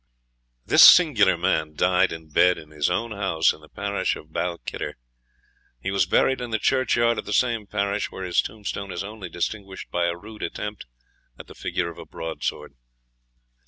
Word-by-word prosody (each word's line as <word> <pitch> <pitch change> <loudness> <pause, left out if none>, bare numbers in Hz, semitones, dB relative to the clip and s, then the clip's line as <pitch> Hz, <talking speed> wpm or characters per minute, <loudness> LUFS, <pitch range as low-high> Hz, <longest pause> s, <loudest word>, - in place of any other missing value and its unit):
This - - +5
singular - - +7
man 75 -1 0
died 90 +3 +3
in 80 -1 -9
bed 90 +4 +4
in 75 0 -12
his 75 +1 0
own 115 +6 -1
house, 95 -6 +1
in 75 - -16
the 75 - -17
parish 100 0 -2
of 75 +1 -13
Balquhidder. 85 -1 -4 0.8
He 95 - -3
was 100 - +2
buried 130 -1 +2
in 120 - -4
the 110 - 0
churchyard 120 -1 +2
of - - -6
the 105 - -4
same 115 -4 +1
parish, 100 0 -1
where 95 - -8
his 90 -1 +2
tombstone 100 -2 -6
is 85 - -4
only 100 -2 -8
distinguished 95 +2 -5
by 85 0 +1
a 85 0 -2
rude 105 +3 -12
attempt 105 -7 -5 0.5
at - - -10
the - - -13
figure 85 -2 -3
of - - -13
a - - -9
broadsword. 80 -2 -5
95 Hz, 180 wpm, -24 LUFS, 85-105 Hz, 0.8 s, singular